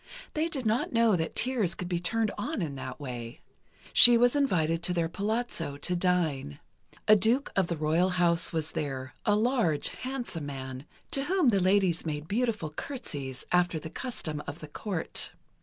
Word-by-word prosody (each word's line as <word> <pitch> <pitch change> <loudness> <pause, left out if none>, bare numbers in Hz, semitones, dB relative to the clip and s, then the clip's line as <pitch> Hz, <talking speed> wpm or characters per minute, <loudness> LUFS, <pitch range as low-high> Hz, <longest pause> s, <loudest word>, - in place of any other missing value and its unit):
They 310 +2 0
did 270 -6 -2
not 220 +3 +1
know 230 -3 +4
that 160 -2 -2
tears 225 -9 +1
could 180 - -4
be 175 -1 -1
turned 220 +4 0
on 210 - -3
in 150 -4 -4
that 130 0 -7
way. 125 0 -7 0.5
She 240 -1 +9
was 245 +3 +4
invited 165 - +1
to 180 +1 0
their 170 -1 +1
palazzo, 200 -5 -2
to 180 +5 +1
dine. 170 - 0 0.5
A 215 - +8
duke 230 +7 +2
of 195 -3 +2
the 170 - -2
royal 160 +4 +2
house 175 -2 +2
was 160 -1 -2
there, 135 -3 -4
a 205 - +5
large, 220 - +1
handsome 245 - -4
man, 130 -1 -6 0.3
to 275 0 +1
whom 355 -5 +3
the 200 -4 +3
ladies 185 -2 +2
made 150 -1 -4
beautiful 215 -6 -1
curtsies, 145 - -5
after 180 -2 +2
the 160 +1 -8
custom 170 - -4
of 145 - -5
the 155 - -9
Court. 175 +2 -3
180 Hz, 175 wpm, -29 LUFS, 155-230 Hz, 0.5 s, She